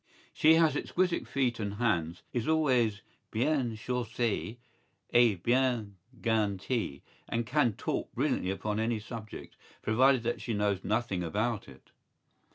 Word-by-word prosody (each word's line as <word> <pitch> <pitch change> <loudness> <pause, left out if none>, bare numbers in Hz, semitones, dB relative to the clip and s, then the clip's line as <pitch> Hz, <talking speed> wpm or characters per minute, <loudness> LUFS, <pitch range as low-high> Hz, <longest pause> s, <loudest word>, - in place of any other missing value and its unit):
¬Ý - - -29
She 155 +1 +6
has 165 -1 +4
exquisite 180 -1 0
feet 125 -4 0
and 100 -2 -3
hands, 90 -7 0
is 120 -3 -1
always 125 -10 +2 0.3
bien 125 -1 0
chaussée 120 -1 -2 0.6
et 115 -7 +4
bien 120 -4 +1 0.3
gantée 110 - -1 0.3
and 115 0 -1
can 130 -4 +2
talk - - -3
brilliantly 90 - 0
upon 105 +2 -2
any 110 0 0
subject, 110 -1 -9 0.3
provided 130 +3 +4
that 120 +1 -2
she 115 - -2
knows 100 -2 0
nothing 110 -4 0
about 105 +6 -1
it. - - -16
115 Hz, 135 wpm, -30 LUFS, 105-125 Hz, 0.6 s, She